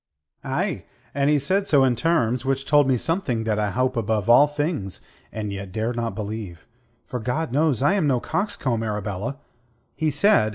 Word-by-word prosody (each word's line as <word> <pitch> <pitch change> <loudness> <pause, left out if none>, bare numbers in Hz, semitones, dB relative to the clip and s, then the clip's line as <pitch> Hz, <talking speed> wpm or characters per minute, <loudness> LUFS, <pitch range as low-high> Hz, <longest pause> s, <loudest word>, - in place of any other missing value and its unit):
"Aye, 155 +5 -2 0.3
and 140 +1 +1
he 150 - +4
said 190 +8 0
so 145 -7 +4
in 130 -2 +3
terms 125 -5 +1
which 135 0 -1
told 145 -1 +4
me 130 -2 +3
something 130 - -1
that 110 -1 0
I 105 -1 0
hope 130 +5 0
above 110 -1 +1
all 145 +5 +7
things, 145 - -3 0.3
and 105 -2 -4
yet 100 -1 -6
dare 110 +4 -2
not 115 -1 -3
believe, 105 -6 -6 0.4
for, 125 - -5
God 125 +6 -2
knows, 145 -2 +2
I 145 - +4
am 190 -7 +1
no 130 -3 +2
coxcomb, 140 - -2
Arabella. 105 +3 -3 0.6
He 160 -1 0
said... 140 - +4
130 Hz, 180 wpm, -23 LUFS, 110-150 Hz, 0.6 s, all